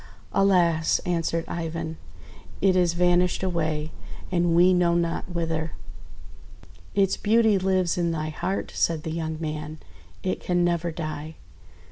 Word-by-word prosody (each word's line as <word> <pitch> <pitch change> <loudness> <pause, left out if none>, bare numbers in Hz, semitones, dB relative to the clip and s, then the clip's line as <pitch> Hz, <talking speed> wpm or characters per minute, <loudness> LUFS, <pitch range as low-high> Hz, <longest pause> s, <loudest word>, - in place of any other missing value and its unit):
"Alas!'1' 175 -6 +3
answered 165 -1 0
Ivan, 165 -1 -4 0.6
"it 190 -1 +3
is 175 -2 +2
vanished 180 +1 +2
away, 160 -4 -1 0.4
and 175 -2 +2
we 180 +2 +6
know 175 -1 +3
not 170 +1 -1
whither." 165 -2 -2 1.2
"Its 195 -1 +2
beauty 220 -1 +3
lives 185 -2 +1
in 170 -1 +1
thy 155 -2 -2
heart," 185 +5 -3
said 160 -2 0
the 160 - -4
young 160 -1 -3
man. 155 -1 -4 0.5
"It 185 - -1
can 175 -1 0
never 170 -1 0
die!" 155 -1 -5
170 Hz, 130 wpm, -25 LUFS, 160-180 Hz, 1.2 s, we